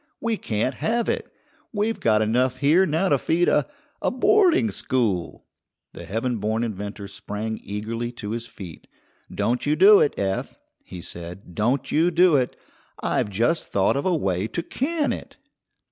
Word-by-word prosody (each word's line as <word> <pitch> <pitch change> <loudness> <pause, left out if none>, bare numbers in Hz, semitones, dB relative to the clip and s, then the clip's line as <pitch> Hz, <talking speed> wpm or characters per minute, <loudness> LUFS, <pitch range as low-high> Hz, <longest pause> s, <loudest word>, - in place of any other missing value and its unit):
We 230 -1 0
can't 115 - -1
have 235 - -1
it. - - -2 0.4
We've 220 0 -1
got 110 -1 +3
enough 125 +4 +1
here 155 +8 +4
now 165 +5 +1
to 140 - +3
feed 175 +6 +1
a 145 - +2 0.3
a - - +1
boarding 340 - +3
school." 100 - -1 0.5
The - - -9
heaven 115 +4 -2
born 110 +2 -1
inventor 100 -2 -5
sprang 105 +2 -5
eagerly 115 +4 -4
to 105 -3 -6
his 115 0 -4
feet. 90 -8 -11 0.4
"Don't 115 +7 -1
you 150 - +3
do 195 +5 +8
it, 145 - +1
Eph," 95 -1 -2 0.3
he 90 - -9
said, 85 +2 -8
"don't 120 +9 0
you 165 +3 +3
do 175 -1 +4
it. 125 -3 +1 0.5
I've - - 0
just 115 - 0
thought 95 +5 +1
of 140 +6 -1
a 180 - +2
way 95 - -1
to 170 - -4
can 295 - -1
it." - - -9
120 Hz, 165 wpm, -24 LUFS, 105-170 Hz, 0.5 s, do